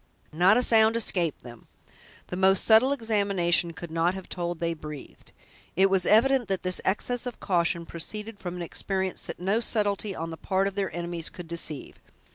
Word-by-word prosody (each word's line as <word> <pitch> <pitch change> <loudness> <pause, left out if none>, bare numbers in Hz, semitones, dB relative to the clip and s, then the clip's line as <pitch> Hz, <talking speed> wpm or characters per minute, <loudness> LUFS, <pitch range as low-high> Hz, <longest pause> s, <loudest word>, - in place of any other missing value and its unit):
Not 180 +7 +5
a 250 - +3
sound 225 -1 +4
escaped 180 -8 +1
them; 120 -2 -13 0.6
the - - -4
most 190 +1 +3
subtle 225 +4 +5
examination 200 -9 +1
could 170 0 -9
not 165 +3 +1
have 190 - -8
told 175 -1 -4
they 170 0 -1
breathed. 150 -3 -10 0.4
It 190 +1 +4
was 190 -2 +2
evident 245 +3 +4
that 190 -1 -2
this 185 -1 -1
excess 245 +6 -1
of 245 - -7
caution 170 -2 +1
proceeded 210 +6 -6
from 175 -1 -6
an 175 - -5
experience 190 +2 -3
that - - -7
no 195 +5 +1
subtlety 205 -3 -1
on 165 +1 -5
the 160 - -7
part 190 +3 0
of 200 - -4
their 195 -1 -2
enemies 170 -1 -3
could 175 -2 -10
deceive. 160 -3 -2
190 Hz, 185 wpm, -27 LUFS, 170-210 Hz, 0.6 s, Not